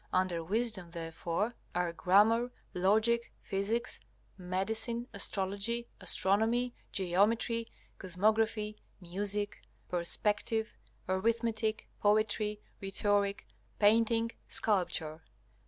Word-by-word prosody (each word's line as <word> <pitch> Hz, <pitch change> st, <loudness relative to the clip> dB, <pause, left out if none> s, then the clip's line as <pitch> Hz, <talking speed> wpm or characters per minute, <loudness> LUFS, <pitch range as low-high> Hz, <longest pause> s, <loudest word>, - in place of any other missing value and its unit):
Under 185 Hz, -2 st, +1 dB
Wisdom 210 Hz, -1 st, 0 dB
therefore 170 Hz, +5 st, -3 dB, 0.2 s
are 175 Hz, -1 st, 0 dB
Grammar, 215 Hz, +8 st, +4 dB, 0.2 s
Logic, 220 Hz, +6 st, +2 dB
Physics, 210 Hz, +3 st, -1 dB, 0.4 s
Medicine, 220 Hz, +6 st, -2 dB
Astrology, 200 Hz, +4 st, -1 dB
Astronomy, 225 Hz, +5 st, +1 dB, 0.2 s
Geometry, 215 Hz, +5 st, +1 dB, 0.3 s
Cosmography, 210 Hz, +3 st, +1 dB, 0.2 s
Music, 205 Hz, +3 st, -2 dB, 0.3 s
Perspective, 210 Hz, +5 st, 0 dB, 0.3 s
Arithmetic, 220 Hz, +2 st, 0 dB
Poetry, 210 Hz, 0 st, +2 dB, 0.2 s
Rhetoric, 200 Hz, +1 st, 0 dB, 0.3 s
Painting, 230 Hz, +2 st, +4 dB, 0.2 s
Sculpture. 175 Hz, -6 st, 0 dB
205 Hz, 75 wpm, -32 LUFS, 185-225 Hz, 0.4 s, Grammar